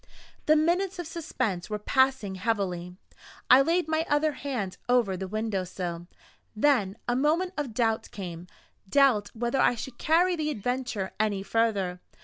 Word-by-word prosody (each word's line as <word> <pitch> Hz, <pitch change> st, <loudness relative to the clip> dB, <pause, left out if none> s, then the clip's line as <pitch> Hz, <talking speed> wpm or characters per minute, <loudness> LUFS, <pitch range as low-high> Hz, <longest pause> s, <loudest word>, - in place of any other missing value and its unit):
The 310 Hz, -, +6 dB
minutes 350 Hz, +5 st, +1 dB
of 350 Hz, -, -4 dB
suspense 225 Hz, -, -3 dB
were 210 Hz, -, -2 dB
passing 260 Hz, -2 st, +1 dB
heavily 185 Hz, -3 st, -2 dB, 0.6 s
I 255 Hz, -, +9 dB
laid 330 Hz, +3 st, +1 dB
my 315 Hz, 0 st, +1 dB
other 295 Hz, +1 st, +2 dB
hand 250 Hz, -10 st, -4 dB
over 240 Hz, -6 st, +3 dB
the 190 Hz, +1 st, -5 dB
window 215 Hz, -1 st, -2 dB
sill, 175 Hz, -1 st, -5 dB, 0.5 s
then 215 Hz, -5 st, +2 dB
a 240 Hz, -, +1 dB
moment 325 Hz, +7 st, +1 dB
of 275 Hz, -7 st, -4 dB
doubt 225 Hz, -2 st, 0 dB
came 175 Hz, -3 st, -7 dB, 0.4 s
doubt 250 Hz, -6 st, +4 dB
whether 240 Hz, +3 st, -1 dB
I 245 Hz, -, +4 dB
should 240 Hz, +2 st, -8 dB
carry 350 Hz, +3 st, +3 dB
the 310 Hz, -2 st, -2 dB
adventure 245 Hz, -5 st, -2 dB
any 205 Hz, -3 st, 0 dB
further. 200 Hz, -5 st, 0 dB
230 Hz, 150 wpm, -27 LUFS, 195-295 Hz, 0.6 s, I